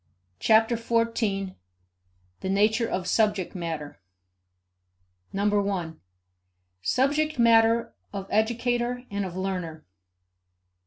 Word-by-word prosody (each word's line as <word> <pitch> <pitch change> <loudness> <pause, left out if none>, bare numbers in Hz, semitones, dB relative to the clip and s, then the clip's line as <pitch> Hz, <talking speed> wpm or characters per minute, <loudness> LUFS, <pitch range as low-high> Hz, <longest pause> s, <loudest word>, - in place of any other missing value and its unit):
Chapter 225 +1 +4
Fourteen: 230 -4 -1 0.8
The 190 - -4
Nature 215 +4 +2
of 185 -1 -2
Subject 205 -2 +1
Matter 165 -5 -5 1.3
1. 200 -5 -1 0.8
Subject 295 - +1
Matter 230 0 +4 0.2
of 195 -2 -5
Educator 240 +3 0
and 200 -1 -2
of 180 -1 -6
Learner. 180 -5 -4
210 Hz, 85 wpm, -26 LUFS, 190-230 Hz, 1.3 s, Chapter